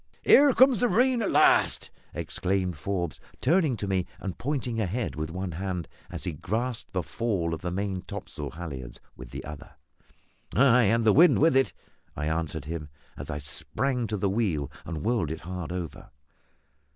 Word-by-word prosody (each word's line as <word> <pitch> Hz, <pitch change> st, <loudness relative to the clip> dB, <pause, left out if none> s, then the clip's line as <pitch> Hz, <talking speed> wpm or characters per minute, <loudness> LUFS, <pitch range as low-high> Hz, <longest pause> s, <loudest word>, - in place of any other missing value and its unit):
"Here 285 Hz, 0 st, +7 dB
comes 260 Hz, -4 st, +6 dB
the 245 Hz, -, +4 dB
rain, 245 Hz, +1 st, +3 dB
at 210 Hz, -, 0 dB
last!" -, -, +4 dB, 0.2 s
exclaimed 95 Hz, -2 st, -1 dB
Forbes, 85 Hz, +1 st, -3 dB, 0.2 s
turning 155 Hz, -3 st, +2 dB
to 100 Hz, -, -3 dB
me 95 Hz, -2 st, 0 dB
and 95 Hz, -3 st, -4 dB
pointing 125 Hz, -4 st, -2 dB
ahead 110 Hz, +5 st, -2 dB
with 75 Hz, 0 st, -3 dB
one 90 Hz, +2 st, -4 dB
hand, 90 Hz, -1 st, -3 dB, 0.2 s
as -, -, -6 dB
he -, -, -2 dB
grasped 110 Hz, -, -3 dB
the 90 Hz, -2 st, 0 dB
fall 95 Hz, -6 st, -1 dB
of 80 Hz, -, -5 dB
the 90 Hz, -, -2 dB
main 95 Hz, 0 st, -2 dB
topsail 75 Hz, -4 st, -6 dB
halliards 70 Hz, -7 st, -7 dB, 0.2 s
with -, -, -10 dB
the -, -, -7 dB
other. 75 Hz, 0 st, -9 dB, 0.8 s
"Ay, 125 Hz, -1 st, +6 dB
and 115 Hz, +3 st, +2 dB
the 110 Hz, -, +6 dB
wind 170 Hz, +4 st, +7 dB
with 160 Hz, -1 st, +4 dB
it," 135 Hz, -8 st, +4 dB, 0.4 s
I 75 Hz, -, -3 dB
answered 80 Hz, -2 st, -2 dB
him, 80 Hz, -1 st, -5 dB, 0.3 s
as -, -, -8 dB
I 75 Hz, -, -2 dB
sprang 115 Hz, -, -2 dB
to 105 Hz, -, -2 dB
the 100 Hz, -, 0 dB
wheel 95 Hz, -, 0 dB
and 80 Hz, -2 st, -5 dB
whirled 110 Hz, -10 st, +1 dB
it 80 Hz, +1 st, -5 dB
hard 90 Hz, -1 st, -5 dB
over. 90 Hz, -3 st, -6 dB
95 Hz, 175 wpm, -27 LUFS, 80-120 Hz, 0.8 s, Here